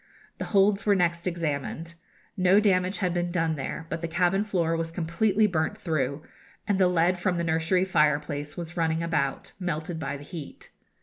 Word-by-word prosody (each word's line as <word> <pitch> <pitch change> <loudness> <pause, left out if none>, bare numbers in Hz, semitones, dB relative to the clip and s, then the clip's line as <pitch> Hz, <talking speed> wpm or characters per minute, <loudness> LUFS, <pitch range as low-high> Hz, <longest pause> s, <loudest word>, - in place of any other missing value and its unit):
The - - -2
holds 200 0 +3
were 205 -1 +4
next 170 -1 0
examined. 165 -1 -3 0.4
No 185 +2 +5
damage 185 -2 +2
had 180 -3 0
been 175 0 -1
done 165 -2 0
there; 150 +3 -5
but 165 - -3
the 170 - -2
cabin 180 +4 +2
floor 175 -6 0
was 165 0 -3
completely 180 +6 +1
burnt 180 +1 0
through, 150 -5 -2 0.4
and 200 -2 +1
the 185 - +5
lead 180 +1 +2
from 180 -1 0
the 170 - 0
nursery 165 +3 +1
fireplace 150 -3 0
was 170 0 -6
running 165 -1 0
about, 150 -5 -1
melted 170 -1 -3
by 145 -3 -3
the 140 - -11
heat. 155 -2 -9
170 Hz, 180 wpm, -27 LUFS, 160-185 Hz, 0.4 s, No